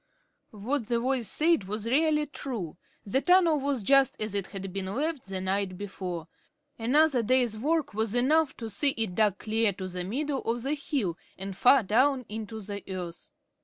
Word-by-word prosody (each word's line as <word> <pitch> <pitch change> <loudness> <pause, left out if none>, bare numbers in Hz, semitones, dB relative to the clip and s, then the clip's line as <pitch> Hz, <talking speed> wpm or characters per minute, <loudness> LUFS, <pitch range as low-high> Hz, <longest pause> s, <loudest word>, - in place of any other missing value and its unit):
What 225 +4 -3
the 235 0 +1
voice 250 -2 0
said 315 - +2
was 210 +2 -3
really 300 +4 +2
true. 240 - -5 0.3
The 235 +7 +1
tunnel 350 -3 +4
was 275 -4 -1
just 275 +4 +4
as 215 -1 -3
it 200 -2 -2
had 195 -2 -7
been 195 -1 -3
left 285 +6 -2
the 190 -1 -4
night 190 0 -1
before. 185 -4 -5 0.5
Another 275 +3 +3
day's 245 -1 +2
work 295 +3 0
was 220 +1 -1
enough 290 +4 +3
to 230 - -5
see 275 +6 +1
it 220 -5 -1
dug 210 -1 +2
clear 220 -1 +1
to 185 0 -6
the 180 -1 -4
middle 270 +8 -2
of 235 +1 -2
the 275 +3 0
hill, 265 - -2 0.2
and 195 0 -6
far 250 +5 +5
down 255 +6 +2
into 220 0 -6
the 200 0 -6
earth. 175 -2 -6
225 Hz, 180 wpm, -28 LUFS, 200-275 Hz, 0.5 s, far